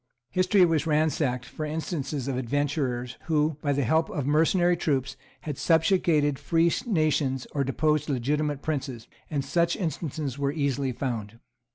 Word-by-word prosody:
History 185 +1 +4
was 165 -2 +1
ransacked 150 -5 +1
for 155 - -7
instances 150 -3 -3
of 135 - -1
adventurers 130 -1 -1
who, 155 -2 +1
by 145 - 0
the 140 0 +1
help 160 +7 +2
of 145 - -3
mercenary 170 +4 +3
troops, 135 -5 -1 0.3
had 150 -3 -5
subjugated 160 -4 +3
free 170 0 +2 0.2
nations 155 - +1
or 140 - 0
deposed 150 +3 0
legitimate 145 +2 -1
princes; 135 -6 -3 0.2
and 140 -3 -2
such 170 0 +1
instances 155 - -3
were 140 0 +1
easily 140 -3 -1
found. 115 -4 -4
145 Hz, 145 wpm, -27 LUFS, 135-160 Hz, 0.3 s, History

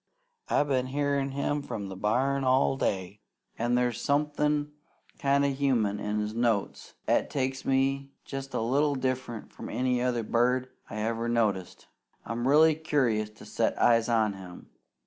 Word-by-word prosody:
I've 145 - +2
been 130 -2 +1
hearin' 140 0 0
him 140 +2 -1
from 105 -7 -5
the 95 - -6
barn 130 +8 +1
all 130 +1 +3
day, 100 -4 -2 0.4
an' 120 +1 +1
there's 125 -1 0
somethin' 150 0 +1 0.5
kind 140 0 +3
o' 140 - +1
human 120 -7 +1
in 105 0 -2
his 105 0 -2
notes 115 -3 -1
'at - - +2
takes 130 -1 -2
me 135 +1 +1 0.2
jest 135 -1 -6
a - - 0
little 140 +5 +2
diffrunt 130 -3 -3
from - - -8
any 125 +1 0
other 125 -2 0
bird 125 +3 +1 0.2
I - - -7
ever 115 +1 -1
noticed. 105 -6 -1 0.4
I'm 120 +2 -2
really 155 +3 +6
curious 130 -9 0
to 105 - -15
set - - -1
eyes 115 0 +4
on 110 -3 +2
him. 90 -2 -11
125 Hz, 160 wpm, -28 LUFS, 110-140 Hz, 0.5 s, really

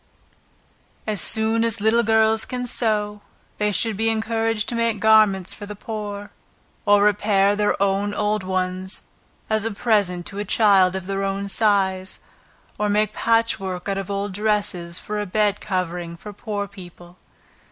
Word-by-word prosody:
As 210 -5 -2
soon 220 +1 +2
as 230 -1 0
little 220 +3 +3
girls 220 0 +3
can 250 -1 -4
sew, 210 -3 0 0.4
they 210 0 +2
should 220 +1 +1
be 225 +3 +1
encouraged 225 -1 -1
to - - -3
make 230 -2 0
garments 215 -4 +4
for 205 - -9
the 210 - -7
poor, 205 -1 -6 0.6
or 205 0 +5
repair 205 -1 +3
their 210 0 0
own 200 +1 +1
old 210 0 0
ones 185 0 -3 0.4
as 220 -1 0
a 225 - -1
present 200 -5 0
to 200 - -6
a - - -1
child 195 -4 +4
of 190 -2 -4
their 195 0 -2
own 195 0 -2
size, 190 -3 +1 0.6
or 210 0 +1
make 210 +1 +1
patchwork 220 -6 0
out 195 0 -1
of 195 - -6
old 200 0 -3
dresses 200 -4 -1
for 210 0 -4
a 205 - -3
bed 210 +1 +1
covering 175 -3 -3
for 210 +4 -10
poor 205 -1 -4
people. 180 -2 -14
205 Hz, 160 wpm, -22 LUFS, 195-220 Hz, 0.6 s, or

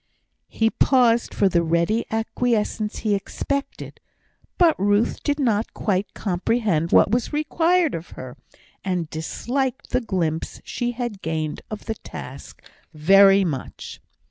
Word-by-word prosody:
He 225 0 0
paused 240 -3 +3
for 200 - +2
the 175 -2 +2
ready 170 +7 0
acquiescence 220 -1 -1
he 210 - +2
expected. 280 +7 -4 0.6
But 340 -3 +5
Ruth 205 +3 +1
did 290 0 -1
not 225 -5 0
quite 200 -1 -1
comprehend 185 -3 0
what - - +5
was 240 +1 0
required 325 +2 +1
of 165 +1 -6
her, 130 -1 -8 0.5
and 180 -4 -2
disliked 255 - -3
the 255 - +1
glimpse 170 -8 -2
she 245 0 -3
had 240 -5 -5
gained 155 -1 -3
of 215 - -7
the 225 - -2
task - - -10 0.3
very 195 +5 +6
much. 140 -7 -6
210 Hz, 130 wpm, -23 LUFS, 175-245 Hz, 0.6 s, very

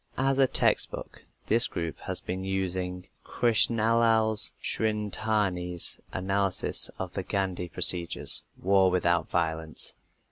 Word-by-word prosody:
As 135 +1 0
a 135 - +5
"textbook" - - -1 0.2
this 115 +2 +4
group 85 -1 -6
has - - -1
been 95 +1 -6
using 90 -1 -4
Krishnalal 115 0 +1 0.2
Shridharani's 105 -5 -2
analysis 95 0 +1
of - - -6
the - - -4
Gandhi 95 -3 -3
procedures, 85 +2 +1 0.2
War 95 0 +2
Without 85 -2 0
Violence. 80 -2 0
95 Hz, 105 wpm, -26 LUFS, 90-110 Hz, 0.2 s, a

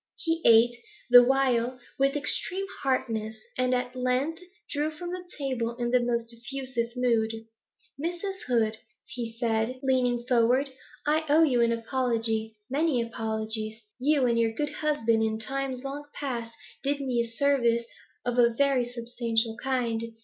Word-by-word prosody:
He 330 0 -1
ate, 230 +1 +6 0.4
the 245 0 +11
while, 255 -1 +2 0.2
with 275 +1 +3
extreme 360 +6 0 0.2
heartiness, 220 -5 -1 0.2
and 255 0 +1
at 250 0 -3
length 255 +7 0 0.3
drew 295 +1 -1
from 345 +3 -7
the 365 0 -5
table 250 -5 -2
in 240 -1 -1
the 250 - +5
most 235 -1 -1
effusive 240 -1 -4
mood. 230 -3 +2 0.7
'Mrs. 355 +3 -3
Hood,' 225 -3 +1 0.3
he 235 -3 -5
said, 230 +1 0
leaning 250 -2 +1
forward, 250 +3 +3 0.3
'I 310 +2 +2
owe 310 +3 +6
you 255 -6 +3
an 235 0 +3
apology, 225 -2 0
many 285 0 +1
apologies. 220 -1 -3 0.2
You 280 0 +3
and 235 -1 +2
your 225 -1 +2
good 295 +5 -2
husband 235 -8 +1
in 220 0 0
times 265 +2 -3
long 285 +2 -5
past 235 -5 -4 0.3
did 280 +1 0
me 255 -4 0
a 235 - -3
service 235 -2 +2 0.4
of 245 0 0
a 235 -1 +5
very 275 -2 +3
substantial 230 -1 -1
kind. 230 -3 -1
245 Hz, 150 wpm, -27 LUFS, 230-275 Hz, 0.7 s, the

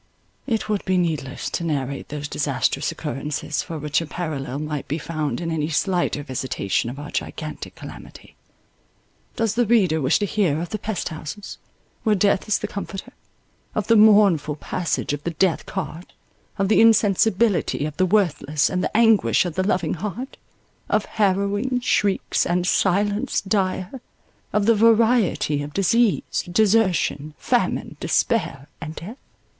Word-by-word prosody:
It 225 -5 -1
would 210 -2 -1
be 185 -1 +1
needless 155 -7 -2
to - - -2
narrate 140 -4 -3
those 145 0 -5
disastrous 140 -1 -1
occurrences, 150 0 -3
for 165 - -6
which 150 +1 0
a 165 - -5
parallel 145 -6 -4
might 150 -1 -4
be 150 - -2
found 155 -2 -3
in 165 -1 -3
any 155 -1 -1
slighter 175 -3 0
visitation 130 -5 -2
of 130 - -7
our 145 0 -8
gigantic 155 -1 -5
calamity. - - -12 1.0
Does 225 -2 0
the 235 0 +1
reader 190 -9 +3
wish 135 +3 +3
to 205 - -1
hear 185 -7 +1
of 170 - -4
the 215 - -4
pest 210 -3 -3
houses, 160 +6 -8 0.4
where 215 -2 +2
death 200 +1 +2
is 215 - +2
the 210 - -4
comforter—of 200 +4 -8
the 230 - +4
mournful 205 -8 +5
passage 160 -1 -2
of 145 0 -5
the - - -1
death 185 -4 +1
cart—of 185 +2 -6
the 215 - +4
insensibility 215 -5 +3
of 155 -1 -5
the 185 - +3
worthless, 155 -7 +1
and 185 -1 -1
the - - -1
anguish 225 -4 +4
of 175 - -3
the 185 - 0
loving 185 -1 0
heart—of 210 - -5
harrowing 205 +5 0
shrieks 205 -5 +1
and 175 +1 0
silence 200 +3 +1
dire—of 200 +2 -3
the 230 - +5
variety 225 -8 +3
of 145 0 -7
disease, 225 +3 +2
desertion, 185 -7 +2
famine, - - -1
despair, 135 +1 0
and 155 0 -6
death? 215 +10 -8
185 Hz, 145 wpm, -22 LUFS, 150-210 Hz, 1.0 s, mournful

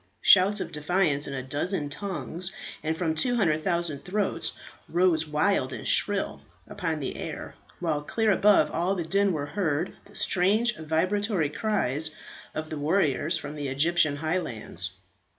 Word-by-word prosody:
Shouts 200 +2 +6
of - - -4
defiance 150 -1 +1
in 140 - -4
a 130 - -4
dozen 145 +4 -1
tongues 180 +1 -3 0.3
and 160 +1 -2
from 165 -3 0
200,000 170 - +1
throats 205 +3 -1 0.4
rose 170 -3 +2
wild 150 -2 +1
and 115 - -5
shrill 205 -1 +1 0.3
upon 175 -7 -3
the 135 - -4
air, - - -6 0.3
while 160 -4 -1
clear 220 +8 +1
above 205 +1 +4
all 180 +4 0
the 175 - -2
din 200 +3 +2
were 150 -4 -2
heard 160 0 -1
the - - -18
strange 215 +6 +3
vibratory 170 +1 0
cries 160 - 0 0.5
of 155 0 -4
the 155 - -4
warriors 155 0 +1
from 160 - -6
the 145 -2 -4
Egyptian 155 +3 +2
highlands. 145 - -3
165 Hz, 145 wpm, -27 LUFS, 150-195 Hz, 0.5 s, Shouts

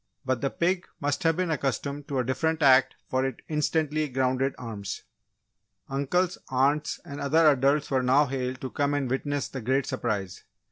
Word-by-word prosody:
but 130 -2 0
the 140 - +1
pig 180 +4 0
must 145 0 -1
have 165 0 +2
been 180 -2 0
accustomed 140 0 -2
to 140 -3 -2
a 130 - +2
different 155 +6 0
act 130 -1 +5
for 130 0 0
it 135 -3 -3
instantly 155 0 0
grounded 130 +1 0
arms. 110 -5 -6 0.9
Uncles, 155 +7 0
aunts, 140 +3 +1
and 145 -4 -7
other 155 +3 +4
adults 140 +2 +1
were 130 -1 +2
now 130 +4 +4
hailed 130 -1 -3
to 130 - -5
come 145 0 0
and 135 -4 -1
witness 145 +1 -1
the 130 - -6
great 130 +4 +1
surprise. 100 -6 -3
140 Hz, 175 wpm, -27 LUFS, 130-150 Hz, 0.9 s, act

